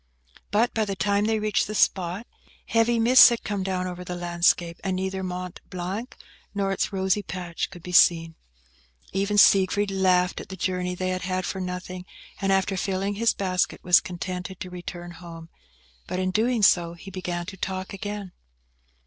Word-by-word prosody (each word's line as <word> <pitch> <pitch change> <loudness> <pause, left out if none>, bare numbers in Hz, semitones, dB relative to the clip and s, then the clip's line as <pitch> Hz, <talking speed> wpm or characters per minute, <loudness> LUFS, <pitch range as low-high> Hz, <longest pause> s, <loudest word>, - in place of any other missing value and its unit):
But, 230 +4 +2
by 220 - +1
the 200 -1 -3
time 200 +1 +1
they 220 0 +1
reached 215 0 0
the 215 - -5
spot, 185 +2 +1 0.4
heavy 230 +1 +2
mists 245 +3 +8
had 235 -1 -3
come 205 -2 -2
down 185 -1 -2
over 180 0 -5
the 180 0 -5
landscape, 175 -1 +1
and 190 -1 -1
neither 190 +1 -2
Mont 180 -1 -5
Blanc 185 +7 -5 0.4
nor 195 -1 0
its 195 - -1
rosy 190 +1 +1
patch 180 -3 -4
could 175 -3 -12
be 180 - -7
seen. 165 -2 +5 0.8
Even 200 +2 0
Siegfried 195 +1 +5
laughed 185 -1 +2
at - - -12
the 190 - -6
journey 180 0 -2
they 185 +1 -2
had 185 0 -2
had 185 0 -2
for 190 - -3
nothing, 180 0 -6 0.3
and, 195 0 +1
after 195 0 +2
filling 195 +1 -1
his 230 +3 +1
basket, 185 -2 -1
was 180 -1 +6
contented 185 0 -6
to 180 - -7
return 175 -1 -7
home; 165 -1 -11 0.6
but 180 - -3
in 185 0 0
doing 225 +2 +1
so, 170 -3 +4
he 195 +3 -11
began 175 -2 -4
to 195 +2 -8
talk 190 0 -4
again. 205 -1 -5
185 Hz, 180 wpm, -25 LUFS, 180-200 Hz, 0.8 s, mists